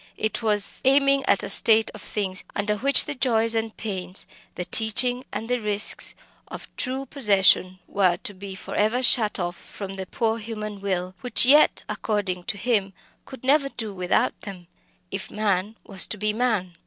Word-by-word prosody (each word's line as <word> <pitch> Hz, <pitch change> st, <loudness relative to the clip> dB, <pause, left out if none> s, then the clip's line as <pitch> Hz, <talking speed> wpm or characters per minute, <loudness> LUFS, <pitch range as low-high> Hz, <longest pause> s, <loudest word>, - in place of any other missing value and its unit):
It 220 Hz, +2 st, -2 dB
was 210 Hz, -3 st, 0 dB
aiming 275 Hz, +1 st, +3 dB
at -, -, +2 dB
a -, -, -5 dB
state 220 Hz, 0 st, +5 dB
of -, -, -11 dB
things 190 Hz, -3 st, -3 dB
under 205 Hz, +1 st, -1 dB
which 275 Hz, +5 st, +5 dB
the 295 Hz, -, -4 dB
joys 230 Hz, -4 st, +2 dB
and 225 Hz, -1 st, -3 dB
pains, 190 Hz, -3 st, -5 dB, 0.3 s
the 180 Hz, -, -3 dB
teaching 245 Hz, +6 st, +1 dB
and 225 Hz, -, -5 dB
the 250 Hz, 0 st, -1 dB
risks 210 Hz, -1 st, 0 dB, 0.3 s
of -, -, -9 dB
true 260 Hz, +2 st, -3 dB
possession, 195 Hz, -8 st, +2 dB
were 185 Hz, -3 st, +1 dB
to 205 Hz, -, -4 dB
be 195 Hz, 0 st, -9 dB
for -, -, -9 dB
ever 220 Hz, +5 st, 0 dB
shut 225 Hz, -4 st, +4 dB
off 175 Hz, -1 st, -3 dB
from 195 Hz, -1 st, -9 dB
the 190 Hz, -1 st, -6 dB
poor 225 Hz, +2 st, -1 dB
human 215 Hz, -2 st, -7 dB
will, 185 Hz, -2 st, -3 dB
which 250 Hz, -1 st, +4 dB
yet, 290 Hz, +4 st, +5 dB
according 190 Hz, -5 st, -3 dB
to -, -, -3 dB
him, 200 Hz, -3 st, -1 dB, 0.3 s
could 265 Hz, -2 st, -12 dB
never 275 Hz, +1 st, +3 dB
do 220 Hz, -6 st, -6 dB
without 180 Hz, -1 st, -1 dB
them, 190 Hz, -4 st, -10 dB, 0.5 s
if 195 Hz, 0 st, -5 dB
man 210 Hz, 0 st, -1 dB
was 195 Hz, -2 st, +2 dB
to -, -, -5 dB
be 210 Hz, +1 st, -1 dB
man. 215 Hz, -6 st, -1 dB
210 Hz, 180 wpm, -23 LUFS, 195-240 Hz, 0.5 s, state